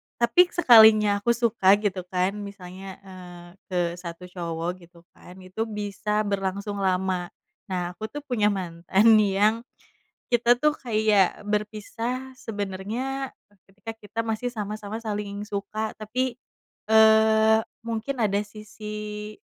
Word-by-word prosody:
tapi 350 Hz, +10 st, +4 dB
sekalinya 220 Hz, -10 st, +6 dB
aku 235 Hz, +3 st, +1 dB
suka 220 Hz, -5 st, +4 dB
gitu 205 Hz, -3 st, -2 dB
kan 185 Hz, +1 st, 0 dB
misalnya, 190 Hz, -1 st, -9 dB
eee, 180 Hz, -2 st, -11 dB, 0.2 s
ke 185 Hz, -, -3 dB, 0.2 s
satu 170 Hz, 0 st, -8 dB
cowok, 170 Hz, -1 st, -3 dB, 0.2 s
gitu 170 Hz, -1 st, -20 dB
kan, 180 Hz, -, -15 dB
itu 220 Hz, +5 st, -4 dB
bisa 210 Hz, 0 st, -2 dB
berlangsung 200 Hz, 0 st, -3 dB
lama. 185 Hz, -2 st, 0 dB, 0.4 s
Nah 180 Hz, -2 st, -3 dB
aku 215 Hz, +4 st, -6 dB
tuh 290 Hz, +6 st, -8 dB
punya 245 Hz, -7 st, +1 dB
mantan 190 Hz, +1 st, +1 dB
yang, 210 Hz, +2 st, +2 dB, 0.7 s
kita 240 Hz, 0 st, +4 dB
tuh 300 Hz, +2 st, +3 dB
kayak 215 Hz, -7 st, +1 dB
berpisah 225 Hz, +5 st, -3 dB
sebenarnya 225 Hz, +6 st, -4 dB, 0.4 s
ketika 205 Hz, +3 st, -9 dB
kita 225 Hz, +1 st, -9 dB
masih 225 Hz, +2 st, -2 dB
sama-sama 215 Hz, 0 st, -5 dB
saling 205 Hz, -1 st, -4 dB
suka, 215 Hz, +1 st, -3 dB
tapi, 245 Hz, +3 st, -2 dB, 0.5 s
eee, 220 Hz, 0 st, +5 dB, 0.3 s
mungkin 230 Hz, +4 st, -3 dB
ada 200 Hz, -1 st, +1 dB
sisi, 210 Hz, 0 st, -8 dB
210 Hz, 120 wpm, -25 LUFS, 190-220 Hz, 0.7 s, sekalinya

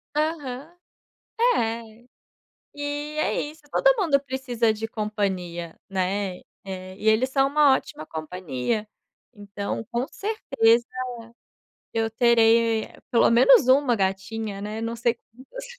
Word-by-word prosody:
Aham. 300 Hz, -2 st, -2 dB, 0.8 s
É. 225 Hz, -, -3 dB, 0.7 s
E 290 Hz, +1 st, -4 dB
é -, -, +1 dB
isso, 300 Hz, +1 st, -8 dB
todo -, -, +4 dB
mundo 300 Hz, -7 st, +3 dB
precisa 250 Hz, -4 st, 0 dB
de 220 Hz, +1 st, -4 dB
companhia, 190 Hz, -6 st, -3 dB
né. 190 Hz, 0 st, -1 dB, 0.3 s
E 190 Hz, +2 st, -6 dB
eles 225 Hz, +4 st, +3 dB
são 270 Hz, 0 st, +3 dB
uma 290 Hz, -1 st, +5 dB
ótima 155 Hz, -, -6 dB
companhia. 160 Hz, -, -3 dB, 0.5 s
Então 205 Hz, 0 st, -5 dB
com 240 Hz, +2 st, 0 dB
certeza, 260 Hz, -, +1 dB, 1.1 s
eu 225 Hz, 0 st, 0 dB
terei 230 Hz, -1 st, +3 dB, 0.2 s
pelo 235 Hz, -2 st, +4 dB
menos 255 Hz, -, +6 dB
uma 260 Hz, -2 st, +4 dB
gatinha, 200 Hz, +1 st, -2 dB
né, 210 Hz, +2 st, -5 dB
não 230 Hz, +1 st, -3 dB
sei 235 Hz, 0 st, +1 dB, 0.2 s
quantas. 270 Hz, -, -10 dB
230 Hz, 115 wpm, -24 LUFS, 205-270 Hz, 1.1 s, menos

